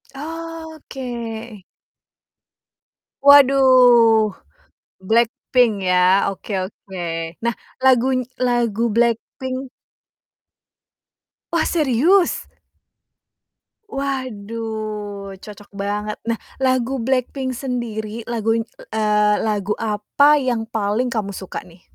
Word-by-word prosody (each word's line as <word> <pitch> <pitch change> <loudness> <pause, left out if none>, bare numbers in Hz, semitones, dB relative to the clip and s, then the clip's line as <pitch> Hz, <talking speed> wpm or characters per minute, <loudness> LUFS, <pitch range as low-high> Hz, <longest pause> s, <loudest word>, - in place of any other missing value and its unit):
Oke. 320 -2 -7 2.2
Waduh, 255 -6 +6 0.7
Blackpink, 240 +1 +2 0.2
ya, 180 - +3 0.3
oke 200 +2 -7 0.2
oke. 190 -2 -11 0.4
Nah, 235 0 +1 0.3
laguny 260 0 +4 0.2
lagu 240 -3 0
Blackpink 255 +3 -1 1.8
Wah, 335 -2 +2
serius? 325 - +2 1.5
Waduh, 215 -6 -4
cocok 205 0 -12
banget. 205 +1 -3
Nah, 230 0 0 0.2
lagu 260 0 +1
Blackpink 260 +2 -1
sendiri, 230 -3 -4
laguny 225 -1 0 0.3
eee, 210 -1 +2
lagu 210 -1 0
apa 225 +7 +3
yang 240 -4 -1
paling 220 +2 -1
kamu 210 -3 -2
suka, 190 -1 -6
nih? 175 0 -18
235 Hz, 75 wpm, -20 LUFS, 210-260 Hz, 2.2 s, Waduh